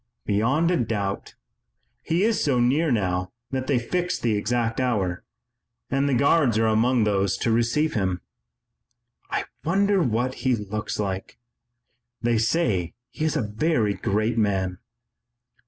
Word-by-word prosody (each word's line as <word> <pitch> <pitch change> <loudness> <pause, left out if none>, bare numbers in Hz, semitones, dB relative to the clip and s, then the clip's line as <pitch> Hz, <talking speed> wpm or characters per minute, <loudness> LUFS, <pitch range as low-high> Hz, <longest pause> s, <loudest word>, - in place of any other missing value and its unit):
"Beyond 130 - +2
a 180 - +2
doubt. 105 -5 -2 0.7
He 170 +4 0
is 225 0 +2
so 135 -4 +2
near 140 +6 +2
now 90 -5 0 0.2
that 130 -1 -2
they 140 - +2
fix 175 +9 -1
the 115 -2 0
exact 115 +3 -1
hour, 100 -9 0 0.7
and 135 +2 +1
the 135 - +2
Guards 140 -3 +3
are 115 - +3
among 115 +2 +3
those 100 -2 +1
to 115 - 0
receive 120 +7 +1
him." 95 -4 0 1.1
"I - - -1 0.2
wonder 195 +3 +2
what 125 -2 0
he 130 -2 +2
looks 105 0 -4
like. 95 -2 -3 0.8
They 120 -1 +1
say 110 - 0 0.2
he 155 - -3
is 155 -1 0
a 130 - 0
very 110 0 +1
great 110 +4 0
man." 95 -3 0
115 Hz, 140 wpm, -24 LUFS, 105-140 Hz, 1.1 s, Guards